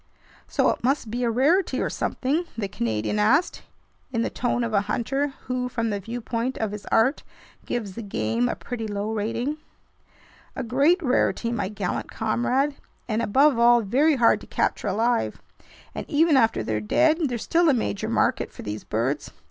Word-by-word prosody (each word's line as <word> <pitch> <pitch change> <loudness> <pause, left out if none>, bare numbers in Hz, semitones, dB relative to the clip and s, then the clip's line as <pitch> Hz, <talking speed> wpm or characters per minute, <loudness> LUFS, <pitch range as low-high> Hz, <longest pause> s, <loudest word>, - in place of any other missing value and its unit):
"So - - +2
it - - -6
must 255 -3 0
be 245 +2 -2
a 235 - +2
rarity 290 - +2
or - - -1
something?" 295 +7 -1
the 210 -3 -2
Canadian 115 - -2
asked, 250 +11 +2 0.5
in 230 -2 0
the - - -2
tone 245 0 -1
of 230 -2 -3
a 200 - +4
hunter 270 +3 -1
who, 250 0 -2
from 230 -2 -1
the 205 - -2
viewpoint 230 +3 -3
of 220 -2 -2
his 210 -1 -8
art, 245 +6 +2 0.5
gives 215 -6 -3
the 230 - -6
game 115 - -1
a - - -2
pretty 225 -3 -5
low 205 +1 -3
rating. 230 +7 -2 1.0
"A - - -3
great 285 - +2
rarity, 250 -3 +1
my 205 -5 -2
gallant 200 -4 -3
comrade, 250 +6 0 0.3
and 220 -1 0
above 260 +4 +3
all 240 0 +6
very 275 +9 +3
hard 240 -3 +4
to - - -12
capture - - -1
alive. 225 +4 0 0.5
And - - -6
even 315 0 +4
after 225 -4 +3
they're 110 -1 -2
dead, 310 - +2
there's 240 -3 -3
still 340 0 +3
a - - +5
major 100 - -2
market - - +1
for - - -10
these 105 +1 -5
birds. 130 +7 -2
235 Hz, 180 wpm, -24 LUFS, 210-270 Hz, 1.0 s, all